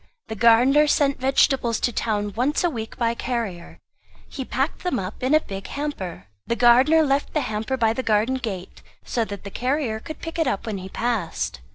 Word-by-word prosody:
The 220 - -4
gardener 245 +7 +5
sent 280 -2 +2
vegetables 260 -3 +2
to 245 - +1
town 210 -2 -1
once 265 +9 +1
a 350 - +2
week 225 -4 -6
by 235 -2 +1
carrier; 230 -8 -4 0.5
he 270 - -6
packed 270 +4 -2
them 360 -8 -1 0.2
in 260 +4 +2
a - - +6
big 195 -9 -7
hamper. 280 - -5 0.2
The 235 - 0
gardener 255 +7 +5
left 280 +1 0
the 305 - +2
hamper 225 +2 -2
by 225 -2 +2
the 260 - -2
garden 225 +3 +1
gate, 195 -8 -6 0.2
so 235 - 0
that 200 -2 -8
the 200 - -8
carrier 250 -2 -1
could 310 +7 -8
pick 330 0 -6
it 325 - +2
up 205 -7 -1
when 210 -4 -3
he 190 +1 -8
passed. 220 - -2
240 Hz, 195 wpm, -23 LUFS, 220-275 Hz, 0.5 s, a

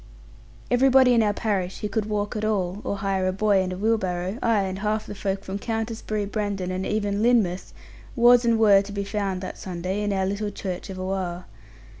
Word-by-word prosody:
Everybody 260 0 +5
in 230 - +4
our 210 -1 +2
parish, 195 -4 -2
who 210 - -1
could 210 +1 -1
walk 205 -1 -2
at 215 - -3
all, 200 -2 -1
or 200 - -2
hire 195 -2 0
a - - +2
boy 200 0 +2
and 185 0 -2
a 185 - -4
wheelbarrow, 190 -1 -1
ay, 225 -4 +2
and 190 0 -4
half 215 +1 -1
the - - -7
folk 195 -1 -3
from 195 +1 -5
Countisbury, 225 -1 -3
Brendon, 200 -3 -3
and 185 +1 -3
even 205 -1 -1
Lynmouth, 215 -6 +2 0.4
was 240 0 +6
and 235 -1 +3
were 205 -3 +6
to 200 +1 -8
be 200 0 -3
found 195 -2 -2
that 185 - -7
Sunday, 185 +2 -3
in 205 0 -1
our 190 -1 0
little 200 +2 -2
church 185 -2 -6
of 190 -1 -6
Oare. 185 -2 -3
200 Hz, 205 wpm, -24 LUFS, 190-215 Hz, 0.4 s, was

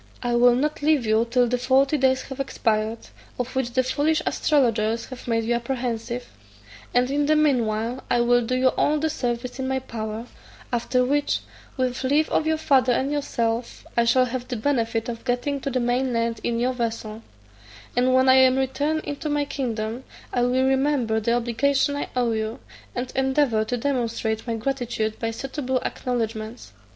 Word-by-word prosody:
I 240 0 0
will 240 0 +6
not 300 +4 -1
leave 295 -4 +3
you 220 +2 +2
till 245 +1 +3
the 250 +1 0
forty 270 +3 +3
days 260 -2 +2
have 265 0 -9
expired, 220 -4 0 0.4
of 250 +1 -4
which 250 -2 -1
the 255 - +3
foolish 300 +4 +1
astrologers 230 -6 +1
have 255 -2 -9
made 230 -1 +1
you 235 +2 0
apprehensive; 240 -1 -3 0.6
and 250 +2 +2
in 290 +1 +1
the 310 - +4
mean 280 -7 +3
while 225 +4 -3
I 240 - +3
will 245 0 +4
do 255 +3 -1
you 255 0 +4
all 300 +3 +1
the 315 +1 0
service 245 0 -3
in 260 - -2
my 265 0 0
power: 225 -3 -5 0.5
after 250 +1 +1
which, 285 +2 +1 0.4
with 255 -1 -1
leave 290 +4 +2
of 315 - +1
your 315 0 +2
father 265 -5 +3
and 265 +4 0
yourself, 235 -5 -2
I 235 - +3
shall 255 +2 +4
have 250 0 -4
the 250 - -3
benefit 230 -2 0
of 230 -1 -5
getting 265 +3 -1
to 275 - -2
the 260 -1 0
main 245 +1 0
land 230 -1 0
in 235 -1 0
your 250 +2 +1
vessel; 225 -2 -4 0.7
and 250 +1 +3
when 260 0 +4
I 260 0 +7
am 260 0 +5
returned 290 +4 0
into 290 +1 -4
my 290 0 +1
kingdom, 235 -3 -3 0.3
I 245 - +1
will 250 +2 +2
remember 265 -4 +2
the 235 +2 0
obligations 270 +5 +1
I 285 - -3
owe 245 -2 +1
you, 220 +3 -2 0.4
and 245 +1 -4
endeavour 265 -4 +2
to 245 +3 -2
demonstrate 230 -4 -1
my 230 - -1
gratitude 230 -3 -2
by 225 - -1
suitable 260 +2 -2
acknowedgments." 225 - -3
250 Hz, 185 wpm, -24 LUFS, 230-265 Hz, 0.7 s, I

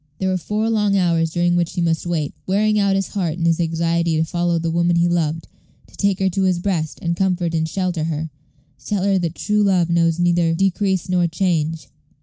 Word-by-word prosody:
There 190 - -1
were 185 - +1
four 210 +5 -2
long 210 -3 +1
hours 170 -3 +2
during 175 +1 +1
which 170 -1 0
he - - -3
must 165 0 0
wait, 160 -4 -2
wearing 210 +2 +2
out 200 -1 +2
his 195 -1 -1
heart 175 -6 -2
in 170 - -2
his 165 0 +2
anxiety 165 0 0
to 160 - +2
follow 175 +1 0
the 165 0 -2
woman 170 +1 +2
he 170 0 +3
loved 165 -2 -1 0.4
to - - -19
take 200 -2 +1
her 190 - +1
to 195 - -1
his 185 -2 +2
breast, 175 -4 -2
and 170 0 0
comfort 180 -2 0
and 160 -1 0
shelter 180 -3 -2
her 160 -1 -3 0.5
to 130 - -23
tell 205 -3 -1
her 195 -1 +2
that 170 -1 -3
true 210 0 0
love 185 -4 +2
knows 165 -1 +2
neither 175 -1 +2
decrease 190 0 0
nor 180 -1 +2
change. 165 -2 -1
175 Hz, 220 wpm, -20 LUFS, 165-190 Hz, 0.5 s, he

